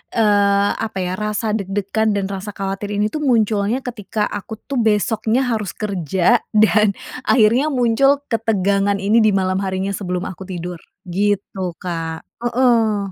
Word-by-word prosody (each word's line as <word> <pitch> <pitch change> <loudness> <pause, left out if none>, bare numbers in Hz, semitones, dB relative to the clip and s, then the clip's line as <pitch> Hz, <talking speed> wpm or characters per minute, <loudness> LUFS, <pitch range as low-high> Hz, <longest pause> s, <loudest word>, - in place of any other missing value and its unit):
eee, 205 -2 +3
apa 220 -3 -4
ya, 185 +3 -3
rasa 210 +1 -1
deg-degan 205 +1 -1
dan 200 0 -2
rasa 195 +1 -6
khawatir 195 +1 -3
ini 210 +1 0
tuh 305 - -3
munculnya 220 +1 +1
ketika, 215 -3 -3
aku 220 +2 -6
tuh 275 -3 -2
besoknya 220 +3 +1
harus 220 -5 -2
kerja 195 - +1 0.2
dan 210 -1 +4 0.3
akhirnya 245 +5 +4
muncul 275 +2 +2
ketegangan 200 -3 +1
ini 220 +3 +4
di 215 -3 +3
malam 185 0 +1
harinya 190 0 -2
sebelum 180 -2 -3
aku 190 +1 -7
tidur 175 -2 -6 0.2
gitu, 190 -1 -2
Kak 165 -2 -4 0.2
heeh. 225 -5 +2
205 Hz, 140 wpm, -19 LUFS, 195-225 Hz, 0.3 s, dan